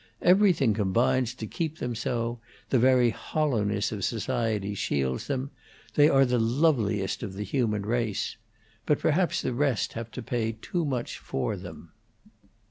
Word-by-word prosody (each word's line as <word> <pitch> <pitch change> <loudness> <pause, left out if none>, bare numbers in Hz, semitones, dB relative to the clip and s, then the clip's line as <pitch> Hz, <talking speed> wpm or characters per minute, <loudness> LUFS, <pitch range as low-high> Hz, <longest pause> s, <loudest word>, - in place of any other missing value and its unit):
Everything 180 - +5
combines 115 +5 +1
to 110 - -6
keep 160 +6 -3
them 125 -4 -3
so; 115 +1 -2 0.3
the 130 - +4
very 125 -1 +4
hollowness 110 -8 -1
of 105 -3 -4
society 115 -3 -1
shields 65 -9 -1
them. 140 0 -2 0.4
They 145 +1 +6
are 135 -3 +5
the 125 -1 +1
loveliest 115 -5 +1
of 100 -4 -5
the 105 - -3
human 105 -2 0
race. 115 -2 -1 0.5
But 150 - +3
perhaps 170 +3 +1
the 125 - -1
rest 135 -2 0
have 115 0 -5
to 125 - -6
pay 115 -1 -1
too 170 +7 -2
much 130 -4 -3
for 85 +10 -2
them." 90 -3 -10
120 Hz, 150 wpm, -27 LUFS, 105-135 Hz, 0.5 s, They